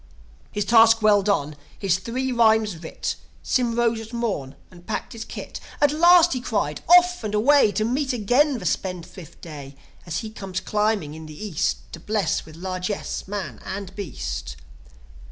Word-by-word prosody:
His 205 -1 -2
task 225 0 +6
well 210 -1 +5
done, 170 -7 0 0.2
his 185 -3 +1
three 255 +6 -3
rhymes 220 -4 +3
writ, 160 0 -4 0.3
Sym 240 -2 +1
rose 235 -1 +1
at 225 0 -10
morn, 195 - -3 0.2
and 175 -1 -16
packed 220 - -4
his 225 -1 -6
kit. - - -8 0.2
"At 290 -1 +4
last!" 345 +2 +6
he 255 - -3
cried. 150 - -2
"Off 360 -3 +6
and 210 -1 -2
away 255 +1 +5
To 215 +3 0
meet 265 +4 0
again 250 +5 +2
the 190 - -8
spendthrift 180 -1 -4
Day, 145 -4 -9 0.3
As 170 0 -2
he 220 - -7
comes 195 -3 -5
climbing 210 -8 0
in 160 0 -9
the 155 -1 -11
East, 65 - -2
To - - -7
bless 210 -6 -1
with 155 - -12
largesse 185 +3 -4
man 190 - -5
and 190 -1 -6
beast. 60 - -5
210 Hz, 170 wpm, -23 LUFS, 175-235 Hz, 0.3 s, task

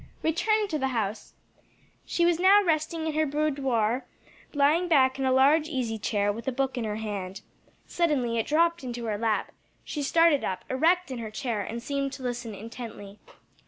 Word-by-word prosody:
Returned 420 +6 +1
to 305 - -1
the 265 - 0
house, 210 0 -3 0.7
she 345 - +1
was 345 -1 +2
now 395 +3 +6
resting 320 -1 0
in 315 - -1
her 310 0 +1
boudoir, 270 -5 0 0.4
lying 300 +5 +2
back 265 -5 +3
in 270 - 0
a 260 - +2
large 290 +4 +4
easy 240 -7 -2
chair 205 -1 0
with 230 +4 -9
a - - +2
book 265 +1 -1
in 240 -3 -2
her 210 -1 -2
hand. 200 -3 -5 0.4
Suddenly 265 -9 0
it 225 - -2
dropped 335 +1 +2
into 240 -2 -5
her 210 -2 -2
lap, 225 -2 0 0.3
she 295 - -4
started 330 +1 +3
up 185 -1 -3
erect 335 +5 +2
in 255 - -4
her 225 -2 -5
chair 220 -1 -3
and 230 +4 -5
seemed 275 0 -2
to 265 - -8
listen 245 -3 -4
intently. 215 -2 -9
265 Hz, 185 wpm, -27 LUFS, 225-315 Hz, 0.7 s, now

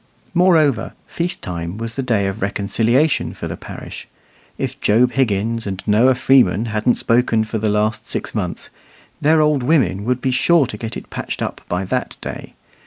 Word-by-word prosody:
Moreover, 165 -7 +3
feast 175 +1 -3
time 85 +1 -5
was 115 0 -5
the 135 - -2
day 115 -6 +1
of 95 +3 -3
reconciliation 115 +8 +1
for - - -5
the - - -5
parish. - - -9 0.5
If - - -4
Job 120 +4 +3
Higgins 115 -3 0
and 95 -1 -5
Noah 115 +5 +4
Freeman 120 -6 +3
hadn't 110 +3 +2
spoken 115 -1 +2
for 110 0 -3
the 110 0 0
last 110 +1 -1
six - - -4
months, 90 -6 -4 0.5
their 155 +1 +4
"old 150 -3 +2
women" 120 - +2
would 125 +1 0
be 130 +1 0
sure 160 +4 +4
to 110 - -7
get 110 +1 -5
it - - -11
patched - - -4
up - - -5
by 90 +2 -1
that 90 - -3
day. - - -8
115 Hz, 175 wpm, -19 LUFS, 105-135 Hz, 0.5 s, Noah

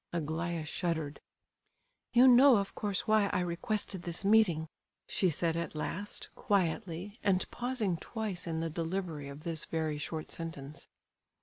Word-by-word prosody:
Aglaya 165 0 -2
shuddered. 160 -3 -2 0.9
"You 250 +2 +7
know 255 +1 +8
of 200 -1 -2
course 205 +1 -1
why 215 -2 +4
I - - 0
requested 180 +2 -2
this 175 +2 -3
meeting?" 195 -7 +4 0.4
she 185 - +2
said 165 +1 0
at 170 -1 -3
last, 195 +6 -3
quietly, 190 +2 -1
and 190 -2 +3
pausing 240 -8 -1
twice 205 -3 -3
in 160 -1 -1
the 165 - -1
delivery 165 -3 -3
of 140 +2 -10
this 165 -2 -1
very 155 -2 -2
short 155 +1 -5
sentence. 155 -3 -7
170 Hz, 140 wpm, -32 LUFS, 160-205 Hz, 0.9 s, know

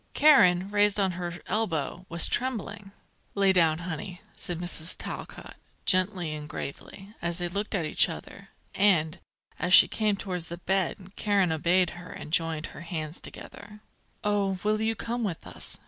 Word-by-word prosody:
Karen, 190 -12 +5
raised 205 0 +3
on 190 -2 +2
her 175 0 -4
elbow, 180 -4 -2
was 170 0 +7
trembling. 220 -5 -3 0.4
"Lay 195 -1 +4
down, 165 -4 +3
honey," 175 +1 -6 0.2
said 175 - -2
Mrs. 175 -1 -5
Talcott, - - -8 0.3
gently 185 -3 +1
and 150 0 -7
gravely, 195 +9 -8
as 170 0 -1
they 175 -1 0
looked 200 +4 -3
at 175 -5 -1
each 155 - +4
other; 195 +4 -9 0.2
and, 175 -4 +2 0.4
as 180 +1 +6
she - - +9
came 215 -2 0
towards 180 -4 -5
the 170 - -6
bed, 190 +1 -2
Karen 200 -4 +1
obeyed 175 +2 +2
her 175 0 -11
and 150 - -9
joined 165 -2 +1
her - - -10
hands 165 -2 -5
together. 210 +1 -9 0.4
"Oh, 200 -2 0
will 215 +1 +1
you 225 0 0
come 235 +3 -3
with 185 -6 -4
us?" - - -5
185 Hz, 165 wpm, -27 LUFS, 170-205 Hz, 0.4 s, she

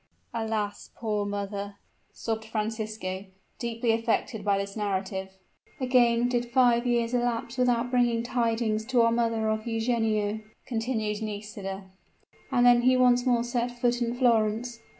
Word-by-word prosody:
"Alas! 220 -3 -3
poor 210 -3 -1
mother!" 200 0 -4 0.4
sobbed 220 -1 -4
Francisco, 215 -3 -3 0.3
deeply 235 0 0
affected 225 -1 0
by 200 -1 +2
this 200 0 -4
narrative. 190 -2 -2 0.5
"Again 245 -2 +3
did 240 -1 -1
five 240 -1 +3
years 235 -1 +1
elapse 240 -1 -1
without 245 -1 +2
bringing 240 -2 +2
tidings 230 -2 0
to 250 0 +3
our 230 - +4
mother 230 -1 +1
of 215 +1 -1
Eugenio," 225 -2 0 0.3
continued 225 -3 -2
Nisida, 205 -2 -5 0.7
"and 245 -2 +3
then 245 -1 +7
he 255 +1 +4
once 250 0 +4
more 240 -2 +3
set 240 0 -1
foot 240 0 +1
in 235 0 0
Florence. 235 -1 +1
230 Hz, 135 wpm, -27 LUFS, 215-240 Hz, 0.7 s, then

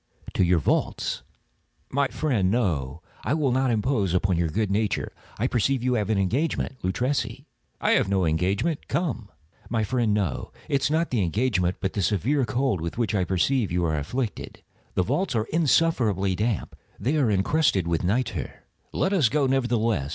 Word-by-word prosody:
"To - - +2
your 90 0 +3
vaults." 80 - 0 0.7
"My 140 +1 +2
friend, 125 -12 0
no; 80 - -1 0.2
I 140 - +1
will 145 -5 +1
not 130 +1 +2
impose 105 -5 +1
upon 95 0 +2
your 85 0 +1
good 105 +4 -1
nature. 105 0 0 0.3
I 110 - 0
perceive 125 +1 +1
you 125 0 +2
have 105 -4 0
an 110 - +2
engagement. 130 - 0
Luchesi—" 125 +10 -1 0.3
"I - - +2
have - - +3
no 95 -2 +2
engagement;—come." 105 - -1 0.4
"My 115 -2 0
friend, 115 0 +1
no. 100 -9 -1 0.2
It 140 - +1
is - - +1
not 160 +2 0
the 120 -5 +1
engagement, 95 -1 +1
but 95 - -2
the 100 - -1
severe 110 - +1
cold 120 -8 0
with 85 +4 -4
which 115 -5 0
I 95 -3 +1
perceive 95 +5 +1
you 90 0 +1
are 80 -2 0
afflicted. 110 - -4 0.3
The 95 - +3
vaults 170 - -1
are 110 -1 +1
insufferably 125 - +2
damp. 110 +1 -2 0.2
They 145 +6 0
are 135 -6 +3
encrusted 100 - +2
with 85 0 0
nitre." 95 - -2 0.3
"Let 190 - 0
us 155 - +4
go, 145 +3 +2
nevertheless. 115 - +1
110 Hz, 175 wpm, -25 LUFS, 95-130 Hz, 0.7 s, us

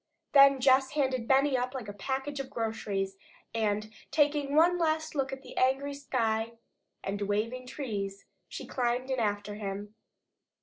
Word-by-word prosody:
Then 275 -1 +7
Jess 265 +1 +4
handed 260 -5 0
Benny 275 +1 +4
up 250 +1 -1
like 245 -5 -5
a 205 - -6
package 265 +7 -3
of 270 -1 -4
groceries 200 -4 -2 0.4
and, 215 -1 -1 0.2
taking 290 -2 +2
one 350 +3 +5
last 315 -1 0
look 270 -3 -1
at 270 +1 -7
the - - -11
angry 270 +2 +2
sky 230 -5 -1 0.5
and 200 +1 -3
waving 225 +5 -1
trees, 200 -8 -4 0.2
she - - -6
climbed 250 +1 -1
in 260 - 0
after 205 -2 -1
him. 205 0 -5
255 Hz, 150 wpm, -30 LUFS, 210-275 Hz, 0.5 s, Then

